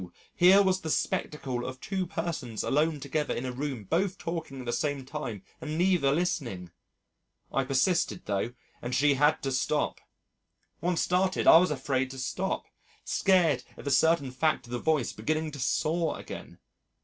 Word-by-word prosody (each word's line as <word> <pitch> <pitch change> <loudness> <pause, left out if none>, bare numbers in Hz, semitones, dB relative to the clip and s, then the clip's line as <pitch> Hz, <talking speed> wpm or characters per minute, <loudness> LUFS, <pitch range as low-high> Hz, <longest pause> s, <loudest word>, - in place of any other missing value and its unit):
here 190 +3 +7
was 190 -1 +1
the 160 - -4
spectacle 130 -5 -1
of 130 +1 -6
two 190 +2 -2
persons 165 - -3
alone 150 +2 +1
together 150 +2 -2
in 125 - -3
a 130 - -2
room 130 -3 -4
both 185 - 0
talking 165 -5 -5
at - - -9
the 120 - -2
same 145 -3 -1
time 130 -9 -5 0.2
and 155 0 -4
neither 175 -6 +3
listening. 130 - -2 0.8
I 135 - +1
persisted 160 +7 +1
though 105 +4 -1 0.3
and 120 +1 -3
she 145 +2 +4
had 145 +3 +2
to 135 - -1
stop. 145 +3 0 0.8
Once 175 +1 +1
started, 185 +1 +1
I - - +10
was 180 +2 +4
afraid 135 -2 -1
to 135 - -9
stop 180 +9 -2 0.4
scared 180 -5 +3
at - - -11
the 140 - 0
certain 160 -3 +3
fact 155 +1 0
of 120 - -13
the 120 - -2
voice 150 -5 +1
beginning 155 +7 -2
to 145 - -8
saw 160 +6 0
again. - - -9
150 Hz, 170 wpm, -28 LUFS, 130-170 Hz, 0.8 s, I